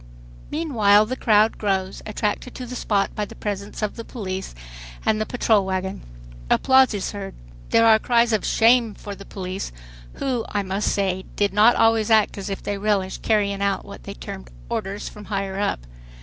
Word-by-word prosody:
Meanwhile 220 -10 +3
the 255 +4 -3
crowd 215 -3 +3
grows, 195 -2 -1
attracted 215 +3 -2
to 255 - -6
the 250 +1 -7
spot 200 -4 0
by 210 - -2
the 205 - -8
presence 205 +1 -5
of 210 - -2
the 230 - -5
police 190 - -5 0.5
and 215 0 +2
the 215 - -2
patrol 220 -4 +2
wagon. 190 0 -3 0.5
Applause 260 -3 +4
is 195 - -3
heard. 200 -2 -7 0.3
There 230 - +4
are 220 -1 +6
cries 235 0 +2
of 215 - +1
"shame" 230 -1 +3
for 205 - -8
the 195 0 -11
police, 185 - -5 0.4
who, 250 -4 -2
I 205 -1 -1
must 195 +2 -1
say, 190 -2 -1
did 205 -1 +1
not 215 +4 +6
always 225 -1 +3
act 215 -2 +3
as 200 - -5
if 195 - -5
they 205 -1 -3
relished 195 -2 0
carrying 200 -2 +1
out 200 -1 0
what - - -11
they - - -7
termed - - -8 0.2
"orders 195 +2 -3
from 210 0 -10
higher 195 -1 -3
up." 205 - -1
205 Hz, 185 wpm, -23 LUFS, 195-225 Hz, 0.5 s, are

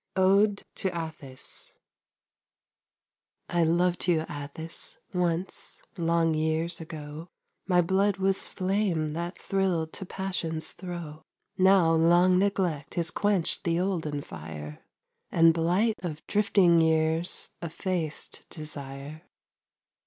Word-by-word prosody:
ODE 200 +2 +4
TO 190 - -2
ATTHIS 155 -6 -5 1.8
I 175 -1 +2
loved 175 +3 +2
you, 170 -3 +3
Atthis, 150 +2 -4 0.2
once, 180 0 -2
long 165 -2 +2
years 160 +2 0
ago! 155 0 -8 0.4
My 180 -2 +4
blood 195 +3 +2
was 195 0 +1
flame 185 -4 0
that 170 +3 -4
thrilled 180 -5 0
to 190 - -4
passion's 170 -5 -2
throe; 170 -4 -7 0.3
Now 190 -3 +5
long 175 +3 +5
neglect 185 -7 0
has 170 -1 0
quenched 200 -2 +1
the 170 -2 +1
olden 165 -6 -1
fire, 75 -2 -8 0.5
And 165 -1 +6
blight 180 +6 +1
of 155 -4 -5
drifting 200 -5 +4
years 160 +1 +1
effaced 170 -2 -3
desire. 145 -1 -7
170 Hz, 105 wpm, -28 LUFS, 160-185 Hz, 1.8 s, And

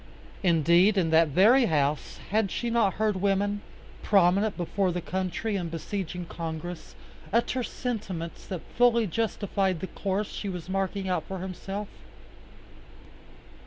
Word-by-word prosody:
Indeed 175 +3 +4
in 165 -4 +2
that 160 0 +5
very 215 - +5
house 150 -4 0
had 215 -1 +2
she 235 +5 -2
not 225 -5 +2
heard 215 -2 +1
women, 200 +1 +1 0.4
prominent 200 +2 +3
before 185 +2 0
the 180 - -2
country 185 +4 -2
and 175 -4 -2
besieging 175 +2 -4
Congress, 165 0 -6 0.4
utter 235 +3 +1
sentiments 200 -10 -4
that 185 -4 -4
fully 235 -1 +4
justified 195 -2 -1
the 190 - -3
course 195 +2 -2
she 200 - -4
was 175 -3 -6
marking 195 0 -2
out 185 - -1
for 190 - -5
herself. 195 +2 -5
190 Hz, 130 wpm, -27 LUFS, 175-205 Hz, 0.4 s, that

